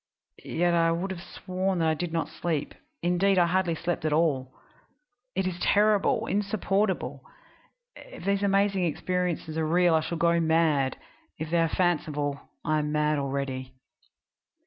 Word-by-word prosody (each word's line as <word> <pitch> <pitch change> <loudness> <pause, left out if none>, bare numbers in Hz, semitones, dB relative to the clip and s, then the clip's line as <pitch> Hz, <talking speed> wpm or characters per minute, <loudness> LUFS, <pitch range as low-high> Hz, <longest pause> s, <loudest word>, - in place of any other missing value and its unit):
Yet 175 +1 +1
I 165 -1 +3
would 175 +4 -2
have 180 -2 -6
sworn 185 +1 -3
that 165 -1 +1
I 160 - +3
did 170 +2 -3
not 165 -1 -1
sleep 160 -2 -3 0.3
indeed, 180 +3 +2
I 175 - +5
hardly 175 -1 +1
sleep 175 0 -3
at 155 - 0
all. 145 -5 +1 0.8
It 190 - 0
is 180 -1 -3
terrible, 210 +2 +3
insupportable! 195 - -1 0.7
If - - -11
these 200 0 +1
amazing 195 -1 +2
experiences 170 -1 -2
are 160 - 0
real 175 +1 +3
I 160 - +5
shall 160 +2 -3
go 170 0 +3
mad; 160 -5 +2 0.4
if 160 0 -5
they 170 - +3
are 165 -1 +2
fanciful 150 -5 -1 0.2
I 155 0 +2
am 150 0 -2
mad 150 0 +1
already. 135 -2 -3
170 Hz, 155 wpm, -27 LUFS, 155-185 Hz, 0.8 s, I